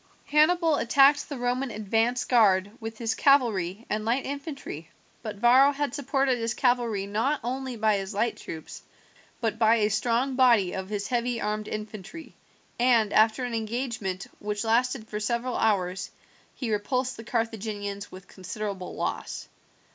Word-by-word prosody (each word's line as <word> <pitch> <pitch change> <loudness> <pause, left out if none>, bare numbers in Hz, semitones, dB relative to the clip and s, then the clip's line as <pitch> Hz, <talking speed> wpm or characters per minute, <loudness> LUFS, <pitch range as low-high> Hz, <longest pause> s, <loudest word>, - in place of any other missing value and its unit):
Hannibal 315 +1 +3
attacked 280 +5 +4
the 285 - -5
Roman 250 +2 -1
advanced 225 +3 0
guard 205 -5 +4
with 225 0 -7
his 230 -1 -1
cavalry 225 -7 +2
and 215 +1 -2
light 235 +5 0
infantry, 275 - -6 0.3
but 215 -2 -5
Varro 250 +6 +5
had 285 -2 -2
supported 270 -2 0
his 230 0 -2
cavalry 240 -6 +1
not 225 +9 0
only 260 +1 -3
by 215 -2 +2
his 195 0 -5
light 225 +3 0
troops, 160 -1 -8 0.6
but 225 -1 -1
by 225 0 +5
a 215 -2 +1
strong 240 +5 +1
body 235 -8 +4
of 190 0 -5
his 205 -1 -3
heavy 240 -1 0
armed 210 0 -2
infantry, 215 - -7 0.5
and 235 -4 +3
after 220 +3 +4
an 245 -1 -3
engagement, 225 -4 -3
which 210 +1 -3
lasted 235 +1 +1
for 210 - -4
several 235 +3 -1
hours, 185 -4 0 0.5
he 245 -4 -3
repulsed 250 +5 -1
the 225 - -9
Carthaginians 215 -3 -3
with 185 0 -12
considerable 190 0 -6
loss. - - -4
230 Hz, 150 wpm, -27 LUFS, 210-255 Hz, 0.6 s, Varro